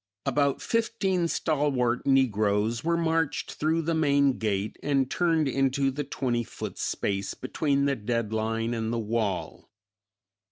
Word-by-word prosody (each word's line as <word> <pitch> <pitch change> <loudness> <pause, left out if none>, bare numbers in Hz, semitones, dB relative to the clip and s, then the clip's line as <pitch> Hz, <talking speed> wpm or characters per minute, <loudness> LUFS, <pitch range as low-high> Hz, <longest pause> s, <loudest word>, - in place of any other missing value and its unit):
About 140 -2 +1
fifteen 200 -6 0
stalwart 140 -8 0
negroes 110 -3 +2
were 170 0 +1
marched 165 -2 0
through 160 +2 0
the 165 +2 0
main 140 -4 +3
gate 105 -1 -2
and 135 -2 +1
turned 165 -4 +2
into 135 +1 +1
the 145 +3 -3
twenty 125 -3 -1
foot - - -7
space 100 -1 -2
between 140 +1 0
the 140 -1 +2
dead 115 -1 -2
line 115 +1 -1
and 115 -1 -2
the 120 - -1
wall. 110 -3 -2
135 Hz, 135 wpm, -27 LUFS, 115-150 Hz, -, main